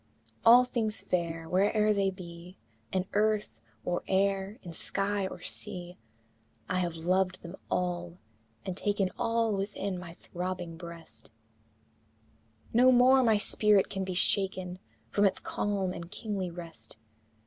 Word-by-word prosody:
All 245 +2 +8
things 225 -3 +1
fair, 165 -2 -2
where'er 210 +4 +3
they 200 -1 +2
be, 180 -1 -10 0.3
In 185 -1 0
earth 210 - +1 0.2
or 175 0 0
air, 195 +2 +1
in 175 - -8
sky 200 +3 -1
or - - -9
sea, 175 +12 -5 0.7
I 185 - 0
have 175 -2 -1
loved 185 +3 0
them 170 +2 -8
all, 175 -1 -2 0.5
and 190 -2 -3
taken 200 -1 0
All 230 -1 +1
within 195 -1 -3
my 170 -2 -9
throbbing 180 -2 -5
breast; 170 -1 -11 1.4
No 250 +3 +6
more 255 +2 +6
my 225 -4 +4
spirit 205 -1 +3
can 195 -1 -2
be 185 -1 -4
shaken 185 -1 +1 0.3
From 205 - +2
its 195 - +3
calm 195 -3 -1
and 170 0 -7
kingly 205 -3 -3
rest! 165 -11 -10
190 Hz, 135 wpm, -30 LUFS, 175-205 Hz, 1.4 s, All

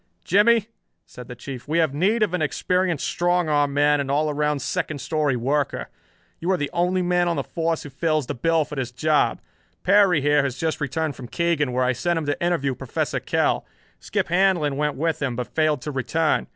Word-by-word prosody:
"Jimmie," 215 +2 +4 0.4
said 125 -1 -11
the 125 - -8
Chief, 125 +1 -8
"we 155 +3 0
have 160 -4 +2
need 205 +9 +2
of 195 -4 -1
an 180 - 0
experienced 180 +2 0
strong 175 -1 +1
arm 145 -2 +2
man 145 +1 +3
and 135 - -5
all 150 +2 +1
around 150 0 0
second 160 -4 -2
story 150 0 0
worker. 135 - -1 0.5
You 170 - -3
are 190 - +3
the 145 -4 -3
only 180 +2 +1
man 175 0 +2
on 170 - 0
the - - -1
force 165 -1 -2
who 145 - -9
fills 155 -1 0
the 145 - -4
bill 160 +4 +1
for - - -11
this 135 -4 -3
job. 155 +4 +1 0.4
Perry 195 -3 +5
here 145 +1 +3
has 135 -2 -3
just 160 -1 -2
returned 150 +1 -2
from 125 -1 -9
Keegan, 165 -2 0
where 125 +1 +1
I 130 0 +2
sent 175 +7 -1
him 160 - -2
to 145 +3 -2
interview 165 -6 +1
Professor - - -3
Kell. - - 0 0.4
Skip - - -2
Handlon 175 -5 +2
went 150 0 -1
with 160 +1 -1
him, 130 -4 -1
but 125 0 -5
failed 155 -4 +1
to 150 - -4
return. 155 +4 0
155 Hz, 210 wpm, -23 LUFS, 140-175 Hz, 0.5 s, Perry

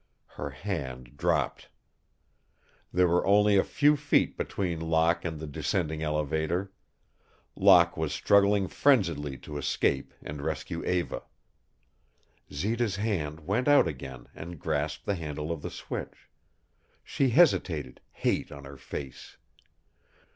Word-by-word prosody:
Her 75 - -5
hand 65 -5 -5
dropped. - - -1 1.2
There 90 0 +3
were 85 +1 +2
only 105 +1 +4
a 95 - +5
few 145 +1 +3
feet 145 0 +1
between 90 -4 -2
Locke 80 +1 +2
and 80 -3 -4
the 80 - -5
descending 80 +1 -2
elevator. 80 +4 -1 0.8
Locke 85 -1 +6
was 80 -2 -1
struggling 100 -1 +3
frenziedly 85 - +2
to 75 -1 -6
escape - - 0
and 75 0 -6
rescue - - -4
Eva. 90 -1 -1 1.3
Zita's 105 +7 -1
hand 85 -8 -2
went 105 - -1
out 145 -9 +6
again 65 -4 -7
and 85 -1 -9
grasped 75 +2 -2
the 100 - 0
handle 75 -3 -4
of 80 -3 -4
the - - -5
switch. - - -7 0.7
She 135 - 0
hesitated, 115 - +2
hate - - -1
on 70 -1 -9
her 70 0 -10
face. 65 0 -8
85 Hz, 125 wpm, -28 LUFS, 75-100 Hz, 1.3 s, Locke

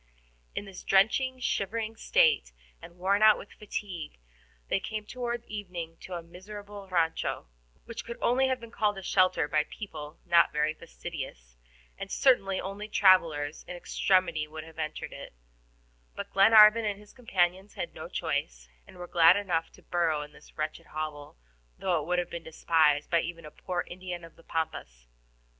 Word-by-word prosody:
In - - -3
this 195 -2 -10
drenching, 255 +7 +3
shivering 225 -1 -1
state, 475 - +3 0.3
and 170 +1 -12
worn 195 +3 +2
out 215 -1 +7
with 200 - -11
fatigue, 195 - -6 0.5
they - - +1
came 215 +1 -5
toward 240 0 -4
evening 180 -6 -6
to 185 - -7
a 170 - -5
miserable 200 +3 -10
RANCHO, 170 -3 0 0.4
which 230 - -6
could 235 0 -7
only 260 +2 +3
have 260 -1 0
been 230 -1 -11
called 210 -3 0
a 195 - -7
shelter 185 -4 +3
by 150 0 +2
people 155 -7 -8
not 170 -1 +5
very 150 +1 +1
fastidious, 140 - -8 0.4
and - - -5
certainly 195 -8 +3
only 200 +2 -5
travelers 165 -8 +3
in 180 - -6
extremity 175 -3 +1
would 155 +1 -8
even 160 0 -14
have - - -12
entered 155 -1 -4
it; - - -10 0.8
but - - -7
Glenarvan 215 +2 +8
and 205 -2 -2
his 210 0 -17
companions 190 -5 0
had - - -4
no - - -8
choice, - - -3 0.2
and - - -14
were 180 - -6
glad 170 +1 +6
enough 175 -5 -1
to - - -18
burrow 165 -4 0
in 150 - -12
this - - -18
wretched 155 0 -4
hovel, 150 - -6 0.4
though 175 -4 +1
it - - -8
would 180 0 +1
have 175 -1 -1
been 170 - -5
despised 155 -2 +2
by 170 -1 +4
even 170 -2 -6
a 150 - -10
poor 180 +2 -3
Indian 180 -1 -7
of 165 - -13
the - - -18
Pampas. 110 - -4
180 Hz, 175 wpm, -29 LUFS, 160-205 Hz, 0.8 s, Glenarvan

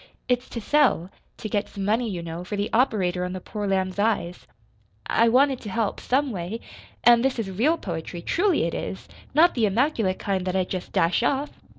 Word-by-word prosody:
"It's 250 0 0
to 235 - -5
sell 230 - +2 0.3
to - - -5
get 205 0 -1
some 195 -2 -5
money, 225 +3 +1
you 175 -4 -4
know, 165 +1 -6
for 195 +3 -5
the 205 +1 -2
operator 190 -8 +2
on 180 0 -3
the 185 - -4
poor 205 +2 -5
lamb's 190 0 -1
eyes. 200 -5 -1 0.6
I 230 - +3
I - - +4
wanted 265 +2 +3
to 210 - -7
help, 215 +2 -1
some 270 +1 0
way. 190 +3 -4 0.4
An' 240 0 +7
this 265 0 0
is 210 -4 -3
REAL 265 - +2
poetry 170 - -6
truly 370 -1 +2
it 165 - -1
is! 190 - -5 0.3
not 340 +3 +6
the 225 -4 +2
immaculate 220 -3 +1
kind 195 -2 -1
that 185 - -1
I 190 - +2
jest 180 0 -5
dash 170 +6 +2
off! 275 +4 0
210 Hz, 210 wpm, -25 LUFS, 185-250 Hz, 0.6 s, An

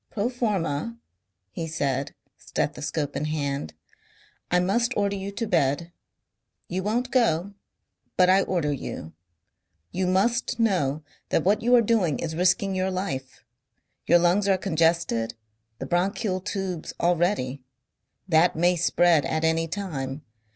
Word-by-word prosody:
"Pro 215 +2 -1
forma," 215 - -2 0.5
he 165 - -4
said, 140 -4 -2 0.2
stethoscope 145 -3 -3
in 145 - -1
hand, 140 - -3 0.7
"I 180 - +3
must 235 +7 +1
order 200 -1 +1
you 195 0 -5
to 230 +3 -2
bed. 170 -3 +1 0.8
You 185 +2 -2
won't 240 +6 -1
go. 200 -6 +2 0.6
But 180 - +6
I 190 +1 +5
order 170 -7 0
you. 80 - -6 0.8
You 185 0 -1
must 235 +6 +1
know 155 -10 +1 0.3
that - - +1
what 200 +3 +2
you 245 +2 +4
are 235 - +5
doing 200 - +2
is 160 -1 -4
risking 185 +3 +2
your 185 0 0
life. 140 -9 -4 0.6
Your 175 - +7
lungs 175 +4 +2
are 195 -1 +4
congested, 165 - +1 0.4
the - - -5
bronchial 185 - 0
tubes 190 -4 -4
already. 170 -6 +1 0.7
That 170 0 +4
may 175 +2 +3
spread 170 -2 +3
at 155 +4 -1
any 165 0 +2
time. 155 -7 -4
175 Hz, 135 wpm, -25 LUFS, 155-200 Hz, 0.8 s, Your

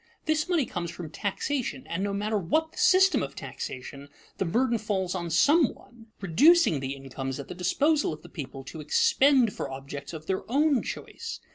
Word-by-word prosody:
This 310 +1 0
money 335 -7 +2
comes 175 -5 -4
from 170 -2 -8
taxation, 200 - -3
and 180 +3 -3
no 200 - -1
matter 210 +2 -1
what 315 - 0
the - - -19
system 380 0 +5
of - - -5
taxation, 140 +2 -7 0.3
the 195 - +1
burden 235 +6 +1
falls 195 -4 -1
on 175 -2 -3
some 280 - +4
one, 235 -2 -18
reducing 235 - +5
the 135 +1 -4
incomes 135 0 -6
at 140 - -8
the - - -5
disposal 280 - +1
of 155 0 -8
the - - -11
people 135 -3 -7
to 145 +4 -8
expend 255 - +3
for - - -4
objects 140 +1 -7
of 155 -2 -8
their 190 +2 -1
own 285 -1 +3
choice. 460 - -6
190 Hz, 185 wpm, -27 LUFS, -, 0.3 s, system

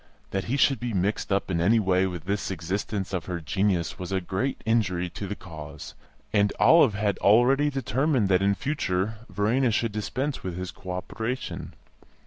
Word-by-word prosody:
That 95 0 -2
he 130 +5 -1
should 135 -3 +3
be 120 -2 -3
mixed 100 +3 -1
up 100 0 0
in 85 -2 0
any 110 +6 +4
way 95 -2 +2
with 90 -4 -6
this 100 +2 -1
exercise 95 +2 -3
of 90 -4 -2
her 90 -2 -3
genius 90 0 0
was 90 0 -5
a 95 - +1
great 95 +9 -2
injury 95 -6 +1
to 100 - -6
the 105 - -4
cause, 80 -7 -9 0.4
and 105 -1 +3
Olive 145 -10 +6
had 105 -1 0
already 125 +8 +4
determined 135 -2 +1
that 95 0 +4
in 100 0 +3
future 110 -5 -1
Verena 110 +7 +1
should 115 0 0
dispense 130 +7 -3
with 90 -2 -5
his 90 0 -4
co 95 - -12
operation. 110 +7 -4
100 Hz, 180 wpm, -26 LUFS, 90-115 Hz, 0.4 s, Olive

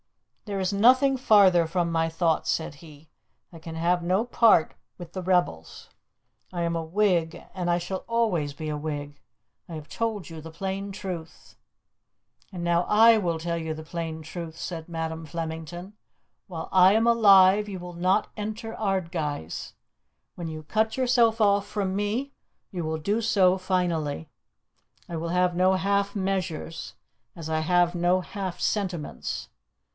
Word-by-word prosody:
"There 200 -2 -3
is 190 +1 -1
nothing 255 +6 +5
farther 200 -9 +5
from 170 0 -1
my 165 0 +1
thoughts," 165 0 0
said 160 -2 -1
he. 155 0 -15 0.5
"I 165 - -10
can 160 0 -8
have 175 +2 +1
no 185 +6 +1
part 230 -8 +4 0.2
with 175 0 -11
rebels. 180 - -1 0.6
I 175 -2 -2
am 170 0 -1
a 165 - -2
Whig, 175 -2 +1
and 180 -2 -2
I 175 - +3
shall 180 +2 -4
always 200 -11 0
be 155 +2 -6
a 150 - -2
Whig. 145 -1 -5 0.5
I 165 - -6
have 155 -1 -8
told 220 0 -3
you 160 -1 -8
the 160 - -9
plain 195 +3 -4
truth." 180 -4 -8 1.0
"And 180 -3 -6
now 170 0 +2
I 225 +2 +7
will 170 -4 -1
tell 170 +1 -2
you 160 -1 -3
the 155 - -8
plain 160 -1 -5
truth," 160 0 -7
said 165 -2 -6
Madam 165 -1 -4
Flemington. 165 +4 -6 0.5
"While 165 -3 -6
I 185 +1 +6
am 225 +2 +3
alive 205 -3 +6
you 190 -2 -5
will 175 0 -8
not 185 +4 +1
enter 220 +1 -5
Ardguys. 165 - -3 0.6
When 170 -2 -5
you 155 -1 -7
cut 220 - 0
yourself 240 -3 +3
off 200 -2 +3
from 195 -3 -2
me 220 +8 -2 0.4
you 180 -4 -4
will 160 0 -2
do 205 +9 -1
so 190 -4 +3
finally. 170 -5 -1 0.8
I 170 - -6
will 165 +1 -3
have 180 0 +1
no 185 +1 +3
half 200 +2 0
measures 185 -5 -3 0.4
as 160 -1 -6
I 160 0 0
have 175 +2 +2
no 175 +2 +2
half 190 0 -5
sentiments. 180 - -3
180 Hz, 160 wpm, -26 LUFS, 165-200 Hz, 1.0 s, I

